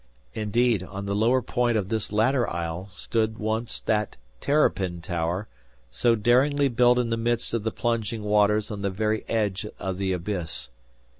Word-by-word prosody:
Indeed, 110 0 +1
on 95 +2 -6
the 100 - -2
lower 120 +4 +3
point 120 -1 +1
of 100 -2 -2
this 110 -2 -2
latter 120 +4 +2
isle 85 +2 -4
stood 110 +3 -2
once 110 +2 -2
that 105 -2 -1 0.2
"Terrapin 95 - +1
Tower" 85 +3 -2 0.4
so 120 -1 +3
daringly 135 +6 +3
built 125 0 +4
in 120 -2 0
the 115 - +1
midst 120 0 -1
of 115 - 0
the 110 - -1
plunging 115 -2 -2
waters 105 0 +2
on 105 -2 -5
the 100 - 0
very 110 +3 -1
edge 105 -3 0
of 95 -1 -4
the 95 -1 0
abyss. 90 -2 -4
110 Hz, 165 wpm, -26 LUFS, 100-120 Hz, 0.4 s, built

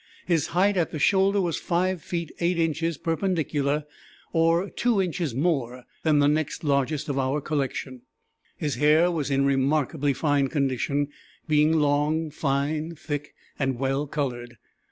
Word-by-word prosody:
His 165 -4 +1
height 195 +3 +2
at 170 - +1
the - - -5
shoulder 195 +5 +3
was 175 -4 -1
5 180 0 0
feet 170 -1 -4
8 175 +1 +1
inches 165 -1 0
perpendicular, 155 -4 -1 0.5
or 165 +3 +3
2 235 -4 +1
inches 170 -7 -1
more 130 -5 -1 0.2
than 155 -2 +3
the 145 0 +4
next 150 +2 0
largest 145 +1 0
of 140 -2 -1
our 135 +2 0
collection. 135 -3 -3 0.6
His 145 -5 -2
hair 155 +5 +4
was 155 -4 -2
in 140 0 +2
remarkably 140 +1 +1
fine 140 0 +1
condition, 140 +1 0 0.4
being 150 0 +4
long, 150 +2 +1
fine, 150 +3 -1
thick, 145 -1 -5 0.2
and 135 -3 0
well 135 +3 -1
colored. 120 -5 -4
150 Hz, 145 wpm, -25 LUFS, 140-165 Hz, 0.6 s, the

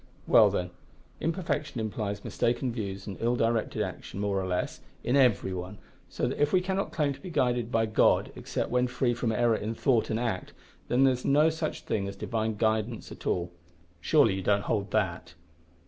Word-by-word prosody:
"Well, - - +6
then, 90 0 -2 0.5
imperfection 155 -6 -2
implies 105 -2 -3
mistaken 120 +1 0
views 100 -4 -5
and 100 - -7
ill 120 +2 +2
directed 115 -1 0
action, - - -6
more 100 -1 0
or 95 - -3
less, 90 -1 -2 0.2
in 125 - +1
every 125 -8 +3
one, 90 +3 -6 0.3
so - - -1
that - - -3
if 145 - +3
we 185 - +5
cannot 190 +2 -2
claim 145 -3 0
to - - -13
be 185 - -7
guided 125 -6 0
by 115 -1 +2
God 110 - +3
except - - -3
when 125 0 +2
free 125 0 0
from 115 -1 -1
error 115 +1 +2
in 110 +1 -3
thought 120 -2 +2
and 110 - 0
act, 115 -6 -3 0.3
then 125 +2 +3
there 135 -1 +5
is 125 - -6
no 150 +3 +4
such 160 0 -3
thing 100 -2 -2
as 100 - -6
Divine 110 +1 -2
guidance 110 +1 -1
at - - -8
all. 90 0 0 0.5
Surely - - +4
you 95 - -3
don't 100 +1 +2
hold 100 -2 -1
that!" 90 -5 -1
115 Hz, 195 wpm, -28 LUFS, 100-130 Hz, 0.5 s, Well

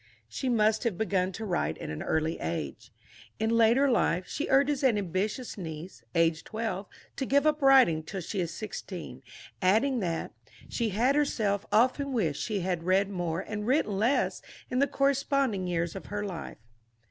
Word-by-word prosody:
She 255 - -3
must 220 -2 +2
have 225 -7 -1
begun 190 -4 0
to 220 - -5
write 175 - -1
at - - -6
an 75 - -5
early 160 +1 -1
age. 80 -4 -4 0.5
In 220 +1 0
later 230 +4 +4
life, 180 -8 +1
she 300 - -3
urges 280 +1 +3
an 245 -5 +4
ambitious 205 +5 -2
niece, 165 +1 -7
aged 165 -1 +2
twelve, 220 -3 -3 0.3
to 270 - -1
give 280 +2 +3
up 305 0 +2
writing 265 - +6
till 185 +5 -6
she 190 +4 -4
is 170 -1 -2
sixteen, 180 - -7 0.4
adding 225 +8 +3
that 170 -5 -2 0.4
"she 235 -2 -1
had 235 +7 +2
herself 215 -9 0
often 260 +5 +2
wished 165 - 0
she 210 -4 -2
had 175 -1 -1
read 190 +3 +2
more 175 -2 -2
and 210 +1 -5
written 240 -7 +1
less 240 +7 +1 0.3
in 250 - +1
the 280 - +4
corresponding 275 -8 +1
years 170 -1 -1
of 195 - -7
her 205 0 -3
life." 180 -5 -6
205 Hz, 170 wpm, -29 LUFS, 175-250 Hz, 0.5 s, writing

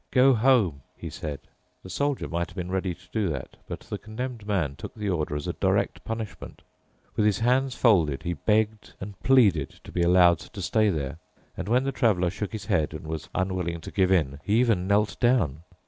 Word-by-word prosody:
"Go 130 +1 +5
home," 110 - +3 0.2
he 80 - -7
said. 75 -5 -5 0.4
The 95 - -10
Soldier 140 +7 -1
might 85 +1 -2
have 90 - -15
been 90 -1 -4
ready 95 -2 -1
to - - -22
do 105 -5 0
that, 70 -5 -5
but - - -6
the - - -6
Condemned 115 0 -6
Man 85 -10 0
took - - -9
the 105 -2 -3
order 80 -5 -1
as 75 - -4
a - - -2
direct - - 0
punishment. 110 -2 -6 0.5
With - - +2
his 105 -1 +3
hands 125 +2 +1
folded 85 - +3
he 85 - -1
begged 105 +2 0
and 100 0 -8
pleaded 105 - +4
to - - -11
be 90 - -1
allowed 85 -1 +5
to 100 - -9
stay 105 +4 +2
there. 75 -3 -3 0.4
And 90 - -5
when 125 +3 +3
the 135 - -1
Traveler 95 -10 +2
shook 105 - -4
his 110 -3 -6
head 80 -4 0
and 75 - -8
was 80 0 -5
unwilling 90 -2 -1
to - - -8
give 95 -1 +2
in, 70 -7 +2
he 105 +3 +2
even 110 -7 +2
knelt 105 +1 +1
down. 115 - +2
95 Hz, 210 wpm, -26 LUFS, 85-110 Hz, 0.5 s, Go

